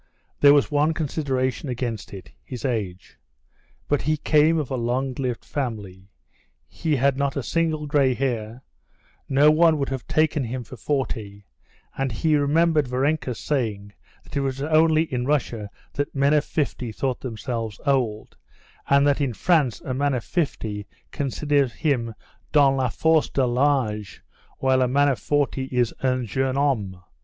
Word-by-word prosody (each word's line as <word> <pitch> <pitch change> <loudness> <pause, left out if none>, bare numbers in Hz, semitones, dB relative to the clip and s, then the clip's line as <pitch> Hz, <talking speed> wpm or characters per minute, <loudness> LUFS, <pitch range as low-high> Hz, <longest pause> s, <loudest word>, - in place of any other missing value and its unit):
There 145 0 +7
was 145 +1 +2
one 150 +2 +2
consideration 135 -3 -2
against 120 -5 -4
it—his 115 +6 -9
age. 105 -8 -4 0.7
But 145 - +1
he 155 +2 0
came 155 +2 +3
of 150 -5 -3
a - - 0
long 130 +2 -1
lived 125 -2 -3
family, 100 -8 -5 0.6
he 160 -3 -1
had 135 0 +2
not 140 -1 -1
a 140 - -2
single 160 -1 -1
gray 140 -3 +2
hair, 120 -2 -3 0.7
no 145 +3 +5
one 160 0 +4
would 140 -1 -2
have 135 -2 -5
taken 155 -3 +1
him 125 +2 -4
for 125 - -11
forty, 110 -6 -3 0.5
and 135 -1 -1
he 155 +8 +1
remembered 150 0 +2
Varenka's 130 0 -1
saying 105 -8 -2 0.3
that - - -12
it - - +1
was 135 -1 -2
only 155 +1 +4
in 125 -5 -3
Russia 120 -8 -1 0.2
that 145 0 -3
men 140 +2 +3
of 150 -1 +3
fifty 130 -6 -2
thought 130 +3 -2
themselves 115 -2 -4
old, 125 -7 0 0.5
and 140 0 +5
that 145 0 +2
in 135 -4 0
France 145 - +2
a 130 - -4
man 140 +1 0
of 120 - -3
fifty 110 - -3 0.2
considers 140 -1 0
himself 120 -8 -1 0.4
dans 140 -3 +5
la 130 -2 0
force 160 +4 +2
de 135 - 0
l'âge, 120 -6 0 0.4
while 130 -1 +2
a 125 - +3
man 140 +3 +3
of 135 - -1
forty 145 -2 0
is 125 -3 0
un 130 -2 0
jeune 130 +4 -1
homme. 115 -10 0
135 Hz, 160 wpm, -24 LUFS, 120-145 Hz, 0.7 s, There